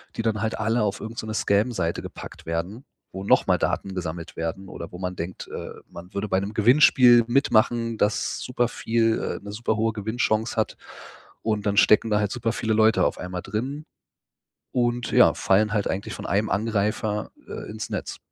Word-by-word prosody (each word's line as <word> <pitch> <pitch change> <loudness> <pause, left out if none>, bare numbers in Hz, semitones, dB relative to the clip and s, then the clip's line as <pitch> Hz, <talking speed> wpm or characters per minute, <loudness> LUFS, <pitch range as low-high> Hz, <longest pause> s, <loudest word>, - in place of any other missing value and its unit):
die - - -2
dann 110 -2 -1
halt 110 0 -1
alle 115 +1 +1
auf 100 - -1
irgend 110 +1 -7
so - - -4
'ne 110 - -4
Scam 105 +3 +2
Seite 85 -7 -2
gepackt - - -9
werden, 90 - -4 0.3
wo 95 +1 -6
noch - - +3
mal - - +4
Daten 95 -1 -2
gesammelt 85 -1 -5
werden 85 +4 -4
oder 85 - -8
wo 90 - -9
man 90 0 -3
denkt, 90 +2 -6
äh, - - -6 0.2
man 85 +2 -11
würde 100 +1 -3
bei 95 - +2
einem 100 +2 -2
Gewinnspiel 120 +1 +6
mitmachen, 115 -2 +2
das 105 - 0
superviel 115 -2 0
äh, - - -20
'ne 100 - -7
superhohe 110 +1 0
Gewinnchance 110 +1 -1
hat. 110 - -1 0.6
Und 110 -2 -1
dann 100 -1 0
stecken 110 +2 +5
da 105 - +3
halt 105 -1 0
superviele 115 -1 -1
Leute 110 +1 +4
auf - - 0
einmal 90 0 -5
drin, 130 +9 -4 0.9
und 120 -1 0
ja, - - +6
fallen 105 +2 +2
halt 105 -2 0
eigentlich 95 +2 -3
von - - -7
einem 100 +4 +1
Angreifer, 105 0 -1 0.2
äh, - - -7
ins - - -6
Netz. - - -4
110 Hz, 185 wpm, -24 LUFS, 100-115 Hz, 0.9 s, Gewinnspiel